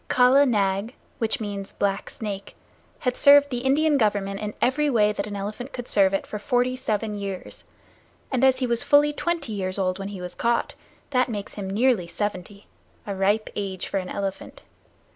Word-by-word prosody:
Kala 255 +3 +5
Nag, 200 0 0 0.2
which 225 -1 0
means 200 -2 -5
Black 200 0 -1
Snake, 200 -3 -6 0.5
had 250 -2 0
served 285 0 +6
the 245 - -1
Indian 285 +3 +2
Government 200 -3 0
in 210 0 -5
every 290 +4 +2
way 210 -5 +3
that 200 0 -4
an 205 - -6
elephant 215 +7 -5
could 245 -1 -6
serve 195 -2 +4
it 195 - -1
for 210 - -6
forty 245 +3 +1
seven 220 -3 -2
years, 200 -2 -6 0.7
and 260 -1 0
as 265 -1 +5
he 255 - 0
was 235 -1 +1
fully 295 +1 +4
twenty 315 -7 -2
years 185 -1 -1
old 185 -1 -1
when 195 - -4
he 200 -2 -7
was 180 0 -6
caught, 235 0 0 0.4
that 255 -1 +2
makes 205 -3 -5
him 195 -2 -5
nearly 215 -3 +2
seventy 200 +1 -4 0.4
a 200 - -3
ripe 200 +3 +1
age 195 -2 -3
for - - -2
an 185 -1 -6
elephant. 200 - -5
210 Hz, 185 wpm, -24 LUFS, 195-255 Hz, 0.7 s, served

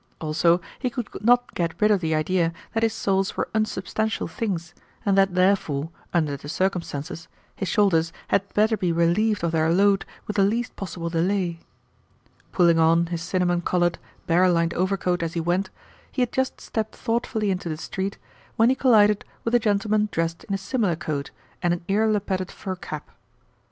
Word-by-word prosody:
Also, 165 +2 +2 0.2
he 255 - -1
could 245 -3 -5
not 245 +2 +3
get 170 -2 -2
rid 210 0 +4
of 205 - +4
the 160 -2 0
idea 165 +2 +1 0.2
that 225 - 0
his 225 -1 +2
souls 195 -3 0
were - - -1
unsubstantial 220 0 -1
things, 175 -8 -3 0.3
and 200 -2 +3
that 195 -2 +3
therefore, 175 -5 +1 0.2
under 155 -5 +1
the 140 +1 -9
circumstances, 170 -3 -2 0.3
his 195 - -3
shoulders 170 -6 +2 0.2
had 200 0 +1
better 220 +2 +4
be 180 -5 0
relieved 175 +5 +2
of 170 - +1
their 160 0 +2
load 195 +2 +4 0.2
with 210 - -4
the - - +5
least 225 +4 0
possible 170 -3 -5
delay. 175 0 0 0.9
Pulling 170 -2 +4
on 165 +1 +4
his 165 - -2
cinnamon 175 0 0
coloured, 175 0 +1 0.3
bear 180 +2 +4
lined 170 -1 +2
overcoat 185 -1 0
as 165 0 -2
he - - 0
went, 175 +4 0 0.4
he 255 - +1
had 245 - -2
just 260 0 -1
stepped 220 -1 -4
thoughtfully 225 -3 -1
into 180 -2 -3
the 155 - -3
street 190 +4 -4 0.4
when 225 +2 +4
he 260 - +3
collided 210 -6 +4 0.2
with 230 - -2
a 240 - +6
gentleman 210 -1 +1
dressed 165 0 -2
in 200 - -2
a - - 0
similar 195 -2 0
coat 145 -3 -4 0.3
and 175 -1 +2
an 170 - -11
ear 210 +3 +2
lappeted 195 -3 -1
fur 190 -1 -5
cap. 155 -4 -8
185 Hz, 180 wpm, -24 LUFS, 170-210 Hz, 0.9 s, a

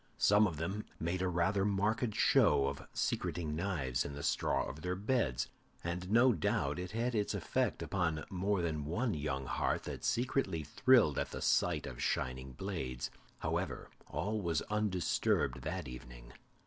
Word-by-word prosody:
Some 105 +1 +5
of 80 -5 -5
them 95 +7 -3
made 85 +3 -1
a 95 - +1
rather 90 +3 +1
marked 105 +3 +1
show 70 - +5
of 70 +1 -4
secreting 80 -4 -1
knives 75 -9 -1
in 70 - -6
the 70 - -6
straw - - +1
of 75 +5 -7
their 90 +2 -1
beds, 105 - 0 0.4
and 90 +2 -3
no 120 +4 +6
doubt 70 -5 0
it 90 0 -4
had 115 +4 -1
its 105 -2 0
effect - - 0
upon 85 -5 -1
more 95 0 0
than 75 -3 -1
one 110 - 0
young 70 -3 -2
heart - - 0
that - - -6
secretly 115 - 0
thrilled 105 - +4
at - - -1
the - - -5
sight - - +2
of 65 - -7
the - - -6
shining 65 +1 -1
blades. 65 -7 -4 0.3
However, - - -2 0.2
all 105 +1 -2
was 85 -4 0
undisturbed 90 - +1
that - - -3
evening. - - -10
90 Hz, 165 wpm, -34 LUFS, 70-105 Hz, 0.4 s, no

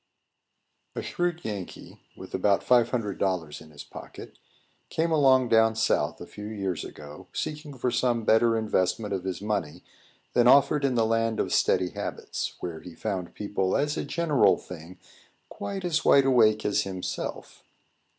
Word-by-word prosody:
A - - -4
SHREWD 175 -1 -2
Yankee, 100 -4 -7 0.2
with - - -11
about 100 -2 +2
five 120 -2 +4
hundred 105 -6 -3
dollars 90 -6 -2
in 80 - -14
his 75 -2 -11
pocket, - - -11 0.5
came 165 +1 0
along 130 -5 +4
down 110 -1 +4
South, 110 0 0
a - - -8
few 105 0 -9
years 95 -5 -3
ago, 75 0 -11
seeking 150 -2 -5
for 125 0 -1
some 120 -1 +1
better 115 +1 +4
investment 105 -1 0
of 95 -1 -3
his 95 +1 -4
money 105 -8 -3 0.5
than 120 0 +4
offered 140 +2 +5
in 130 -2 +1
the 115 -1 +3
land 115 0 0
of - - -1
steady 90 - +2
habits, - - -5
where 85 -3 -5
he 85 +1 -11
found 95 -5 -4
people, 95 -2 -1
as 145 +1 0
a - - -2
general 145 - +2
thing, 90 +1 -11 0.5
quite 195 -2 -5
as 165 -2 0
wide 140 -1 +5
awake 110 -5 +4
as 105 0 +2
himself. 95 -2 -5
110 Hz, 160 wpm, -27 LUFS, 95-130 Hz, 0.5 s, offered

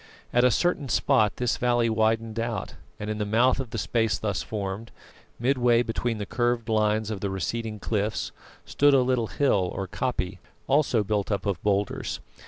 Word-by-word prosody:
At 120 - +4
a 125 - +6
certain 145 +1 0
spot 105 -2 +3
this 125 -2 0
valley 120 -1 +2
widened 110 0 +1
out, 115 0 -3 0.3
and 105 - -5
in 110 0 -3
the - - +1
mouth 120 +6 +3
of 130 -3 -4
the 115 - -5
space 110 +1 +1
thus 100 -4 -2
formed, 105 +1 -4 0.5
midway 120 -1 +3
between 115 0 -2
the 105 - -4
curved 120 0 0
lines 110 0 +1
of 105 - -3
the 100 - -2
receding 110 +3 -3
cliffs, 105 +1 -2 0.3
stood 145 0 +4
a 135 - +5
little 125 -3 +1
hill 100 -11 +1
or 95 - -3
koppie, 100 -4 -2 0.3
also 135 -6 +2
built 105 0 -1
up 100 - -1
of 100 -4 -1
boulders. 100 -1 -1
110 Hz, 180 wpm, -26 LUFS, 105-120 Hz, 0.5 s, a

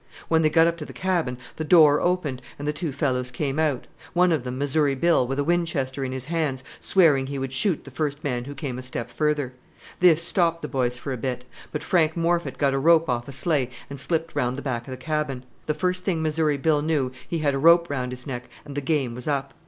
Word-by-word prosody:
When 160 0 +4
they 155 - +4
got 165 +1 +5
up 170 0 +1
to 155 - -6
the - - -10
cabin 170 -9 -1 0.2
the 160 - -2
door 155 -3 +6
opened 170 -8 0 0.2
and 145 - -5
the 150 - +1
two 150 +1 -3
fellows 130 -2 -1
came 135 +3 -2
out; 150 -6 0 0.3
one 180 0 +4
of 155 -6 +1
them, 125 0 -4
Missouri 145 0 +1
Bill, 160 -3 +3
with 135 +1 -2
a 145 - +1
Winchester 145 -5 0
in 130 - -3
his 130 0 -5
hands, 150 -5 -1 0.2
swearing 150 -8 +3
he 140 0 -4
would 135 -1 -4
shoot 175 +4 0
the 140 - -11
first 145 +1 -3
man 125 -4 -2
who 145 +1 -7
came 135 -3 -4
a - - -5
step 130 -2 -5
further. 150 -4 0 0.5
This 170 -2 +5
stopped 170 -2 +2
the - - -2
boys 125 -3 -1
for 135 +2 -4
a - - -3
bit; 125 +1 -3 0.3
but 150 - -4
Frank 160 -2 +2
Morphet 170 +1 0
got 140 -2 +2
a 135 - +1
rope 165 +2 +4
off 120 -1 -1
a - - -6
sleigh 135 -1 0 0.2
and 140 - -6
slipped 165 +2 -1
round 130 0 -1
back 120 -4 -3
of - - -7
the 130 - -5
cabin. 140 -2 -2 0.2
The 150 - 0
first 180 +2 -1
thing 170 -4 0
Missouri 155 -1 +1
Bill 150 +1 +2
knew 145 -4 0 0.2
he 170 - -2
had 150 -3 +1
a 135 - -1
rope 170 +3 +6
round 125 -4 -3
his 125 0 -6
neck 125 -3 -5 0.2
and 145 - -8
the 145 - -1
game 135 -4 0
was 125 +3 -7
up! 140 -2 -1
145 Hz, 245 wpm, -24 LUFS, 130-160 Hz, 0.5 s, door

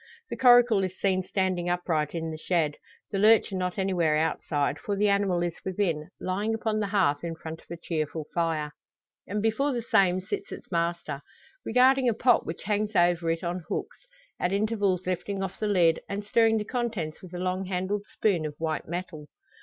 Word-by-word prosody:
The - - -2
coracle 245 -5 +6
is 185 0 -4
seen 190 -2 +2
standing 185 -2 -1
upright 170 -4 -1
in 165 -1 -3
the 155 - -5
shed; 160 -4 0 0.3
the 195 - -1
lurcher 215 -1 +5
not 180 -1 -2
anywhere 175 -5 +2
outside 145 -2 0
for 200 +7 -2
the 205 +1 +2
animal 200 -3 +2
is 175 -1 -1
within, 175 -5 -1
lying 205 +4 -1
upon 220 -1 -1
the 205 - 0
hearth 185 -8 +1
in 165 -1 -3
front 160 0 -8
of - - -26
a 170 - -6
cheerful 155 -2 -3
fire. 160 -3 0 0.6
And 205 +1 -2
before 270 +6 +1
the 240 -2 -2
same 195 -6 +3
sits 185 - -5
its - - -9
master, 170 -4 -1 0.4
regarding 255 +2 +4
a 225 - 0
pot 245 +1 +3
which 165 - -5
hangs 210 +1 -1
over 175 -1 +3
it 165 +1 -1
on 175 +1 -2
hooks; - - -5 0.3
at 180 - 0
intervals 200 -3 0
lifting 195 +2 -2
off 190 - -5
the 215 - 0
lid, 175 -5 +3
and 200 +1 -3
stirring 225 +1 +3
the 210 - -2
contents 225 -11 -3
with 180 -2 -10
a - - -3
long 185 +1 -1
handled 190 +2 -2
spoon 190 -7 +1
of 150 - -8
white 160 -1 -2
metal. 170 -3 -5
185 Hz, 195 wpm, -27 LUFS, 165-210 Hz, 0.6 s, coracle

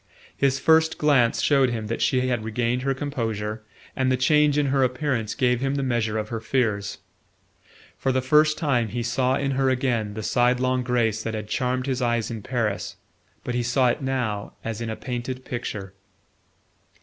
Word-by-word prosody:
His 140 -1 +2
first 160 +3 +3
glance 135 -6 +3
showed 135 -3 +4
him 115 -2 -3
that 115 +2 -3
she 130 - +2
had 120 -3 -1
regained 115 +3 -1
her 135 +1 0
composure, 110 -6 -3 0.3
and 130 -1 +1
the 130 - +2
change 150 +2 +3
in 145 - +2
her 135 - +3
appearance 125 -3 -1
gave 125 -3 +2
him 135 +1 0
the 140 - -1
measure 115 -4 0
of 110 0 -3
her 115 - -3
fears. 110 -4 -1 1.0
For 135 - +1
the 130 - +1
first 150 +4 +3
time 125 -7 +1
he 120 +2 -3
saw 125 +2 +1
in 140 0 -1
her 135 0 +2
again 120 -5 0
the 110 - -5
sidelong 125 +2 +2
grace 120 -3 0
that 110 0 -3
had 105 -1 -5
charmed 125 +3 -1
his 130 -2 -1
eyes 120 -2 0
in 115 -2 -5
Paris; 115 -3 -2 0.5
but 125 - -3
he 120 - 0
saw 120 +2 +2
it 120 - -1
now 125 -6 -2
as 115 0 -4
in 115 - -3
a 110 - -3
painted 130 +1 -5
picture. 105 -5 -5
125 Hz, 185 wpm, -24 LUFS, 115-135 Hz, 1.0 s, showed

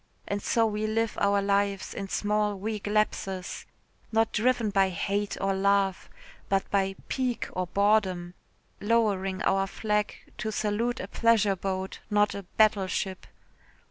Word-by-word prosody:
And 200 0 -2
so 230 +2 +2
we 215 0 -1
live 225 0 0
our 200 0 +3
lives 200 -1 0
in 195 -1 -5
small 210 0 0
weak 210 +1 -4
lapses 195 -3 -1 0.4
not 225 0 +2
driven 235 -1 +2
by 195 -1 +3
hate 200 +3 -2
or 195 0 +1
love, 195 -1 +1 0.4
but 195 0 +1
by 195 -1 +1
pique 255 -3 -1
or 185 0 -2
boredom, 190 -3 +1 0.5
lowering 200 -4 +1
our 195 0 +2
flag 210 +1 -1 0.2
to 220 - -2
salute 220 +4 -1
a - - -5
pleasure 220 -4 +3
boat, 190 0 -4
not 210 -1 +3
a 200 - -5 0.2
battleship. 195 -3 +1
205 Hz, 140 wpm, -28 LUFS, 195-215 Hz, 0.5 s, our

